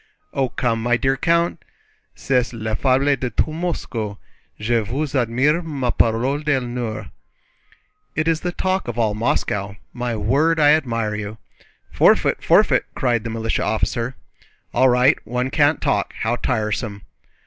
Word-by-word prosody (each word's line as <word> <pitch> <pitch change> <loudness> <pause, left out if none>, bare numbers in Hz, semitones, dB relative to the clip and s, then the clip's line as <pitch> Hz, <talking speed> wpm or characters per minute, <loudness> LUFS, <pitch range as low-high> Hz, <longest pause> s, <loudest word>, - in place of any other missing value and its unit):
"Oh, 135 -2 0
come, 120 -3 -1
my 120 +1 +2
dear 135 +2 +1
count! 170 +5 +1 0.5
C'est 125 -2 0
la 110 -1 -4
fable 135 +4 +2
de 130 -1 -3
tout 155 +7 0
Moscou. 120 - -3 0.4
Je 115 +2 +1
vous 135 +7 -3
admire, 130 +6 +2
ma 140 -7 -2
parole 120 +6 +1
d'honneur!" 125 -6 -2 1.0
"It 155 +2 0
is 165 -1 +2
the 175 - -3
talk 185 +1 -1
of 120 -1 -4
all 110 -3 +1
Moscow. 100 -2 -1 0.2
My 120 -1 -3
word, 140 +10 +2
I 145 -1 +6
admire 115 -8 +1
you!" 105 +1 -5 0.5
"Forfeit, - - +3
forfeit!" - - +4
cried 120 -4 0
the 115 - -4
militia 115 0 -2
officer. 115 +3 -1 0.6
"All 130 +2 +4
right, 125 +4 +4
one 125 +2 -2
can't 145 0 +3
talk—how 110 +3 -1
tiresome!" 105 -2 -2
125 Hz, 140 wpm, -21 LUFS, 115-145 Hz, 1.0 s, I